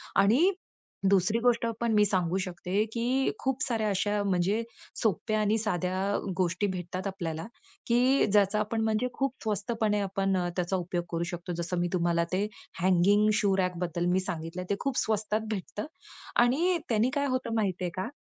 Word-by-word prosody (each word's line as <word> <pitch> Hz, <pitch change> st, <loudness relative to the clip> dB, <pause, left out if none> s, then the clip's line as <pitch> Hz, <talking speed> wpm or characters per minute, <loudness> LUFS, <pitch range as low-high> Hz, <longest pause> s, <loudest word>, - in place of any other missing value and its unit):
आणि 240 Hz, -, +5 dB, 0.6 s
दुसरी 200 Hz, +3 st, +3 dB
गोष्टं 235 Hz, -1 st, +2 dB
पण 235 Hz, -1 st, +1 dB
मी 210 Hz, -1 st, +5 dB
सांगू 185 Hz, -2 st, +1 dB
शकते 185 Hz, +3 st, -1 dB
की 250 Hz, +3 st, +1 dB
खूप 265 Hz, +1 st, -1 dB
साऱ्या 225 Hz, -4 st, 0 dB
अशा 205 Hz, +1 st, 0 dB
म्हणजे 195 Hz, +3 st, +1 dB, 0.4 s
सोप्या 215 Hz, +1 st, +1 dB
आणि 210 Hz, +1 st, +2 dB
साध्या 190 Hz, -1 st, -1 dB, 0.2 s
गोष्टी 185 Hz, +2 st, +1 dB
भेटतात 185 Hz, 0 st, -4 dB
आपल्याला, 165 Hz, -5 st, -4 dB, 0.4 s
की 250 Hz, +3 st, +4 dB
ज्याचा 205 Hz, 0 st, +3 dB
आपण 215 Hz, +1 st, -1 dB
म्हणजे 220 Hz, +2 st, +1 dB
खूप 275 Hz, -1 st, -1 dB
स्वस्तपणे 215 Hz, 0 st, 0 dB
आपण 195 Hz, -1 st, 0 dB, 0.2 s
त्याचा 180 Hz, +1 st, 0 dB
उपयोग 175 Hz, -1 st, -2 dB
करू 170 Hz, 0 st, -1 dB
शकतो. 175 Hz, +1 st, -5 dB
जसं 170 Hz, +1 st, -3 dB
मी 175 Hz, -, +1 dB
तुम्हाला 170 Hz, -1 st, +2 dB
ते 200 Hz, +3 st, +1 dB, 0.3 s
हँगिंग 190 Hz, +4 st, +4 dB
शू 200 Hz, -2 st, +3 dB
रॅकबद्दल 180 Hz, -1 st, 0 dB
सांगितलं 170 Hz, 0 st, -4 dB
ते 200 Hz, -, +2 dB
खूप 275 Hz, -2 st, -2 dB
स्वस्तात 215 Hz, 0 st, 0 dB
भेटतं 210 Hz, 0 st, -4 dB, 0.6 s
आणि 330 Hz, +9 st, +2 dB
त्यांनी 225 Hz, +1 st, +3 dB
काय 285 Hz, 0 st, +1 dB
होतं 255 Hz, -3 st, -1 dB
माहिती 190 Hz, -5 st, 0 dB
आहे 175 Hz, -, -2 dB
का? 185 Hz, -, -2 dB
200 Hz, 160 wpm, -29 LUFS, 180-225 Hz, 0.6 s, आणि